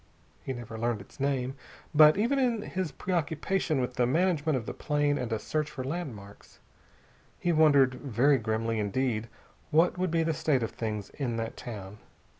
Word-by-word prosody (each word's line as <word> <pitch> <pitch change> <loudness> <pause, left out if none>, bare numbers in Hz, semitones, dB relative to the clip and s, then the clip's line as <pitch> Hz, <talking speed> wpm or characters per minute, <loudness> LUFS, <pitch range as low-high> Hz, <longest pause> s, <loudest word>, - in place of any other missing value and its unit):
He - - -4
never 120 -3 -6
learned 120 -1 0
its 100 - -15
name, 135 -2 0 0.4
but 155 +1 +7
even 240 +7 +2
in 235 -5 +1
his 185 -6 -3
preoccupation 165 0 -1
with 125 0 -1
the 125 -1 +1
management 160 -1 +2
of 115 - -5
the - - -4
plane 145 -1 0
and 120 -2 -3
a 110 - +1
search 150 +6 -2
for 145 -4 -6
landmarks, 130 - -7 0.8
he 175 - 0
wondered 145 -5 +5
very 135 +1 +2
grimly 110 0 -1
indeed 110 +1 -1 0.4
what 165 +3 +3
would 185 0 +1
be 165 0 +2
the 160 0 0
state 140 -4 +1
of 115 - -3
things 105 -3 -4
in 125 -5 -3
that 115 0 -3
town. 105 -3 -8
135 Hz, 175 wpm, -29 LUFS, 115-160 Hz, 0.8 s, but